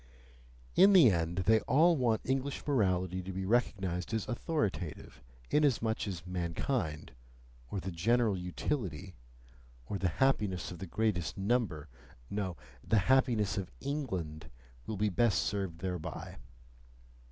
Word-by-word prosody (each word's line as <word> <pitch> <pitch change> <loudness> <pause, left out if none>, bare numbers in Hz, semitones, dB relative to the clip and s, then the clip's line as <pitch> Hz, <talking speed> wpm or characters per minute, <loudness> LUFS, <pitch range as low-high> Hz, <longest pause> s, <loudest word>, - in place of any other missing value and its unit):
In 195 +3 +7
the 160 - +8
end, 85 0 -1
they 110 +2 +5
all 165 +9 +4
want 120 -6 +1
English 135 +1 -2
morality 95 - +1
to 95 +1 -6
be 95 +1 -4
recognized 95 -3 0
as 110 - -2
authoritative, 105 - -3 0.3
inasmuch 115 -8 +2
as 90 -4 -5
mankind, 85 - -2 0.6
or 100 - -3
the 95 +1 -5
"general 110 +5 +2
utility," 90 - -3 0.7
or 100 +10 -4
"the 90 - +1
happiness 105 -11 +1
of 90 - -8
the 95 - -6
greatest 100 -3 -1
number," 100 -7 0 0.4
no! 95 -4 -2 0.3
the 110 - +2 0.2
happiness 115 -7 +2
of 95 - -5
ENGLAND, 95 - -4 0.4
will 110 - -3
be 105 +2 +2
best 100 -1 +2
served 95 -5 -3
thereby. 90 -4 -5
100 Hz, 130 wpm, -32 LUFS, 90-120 Hz, 0.7 s, the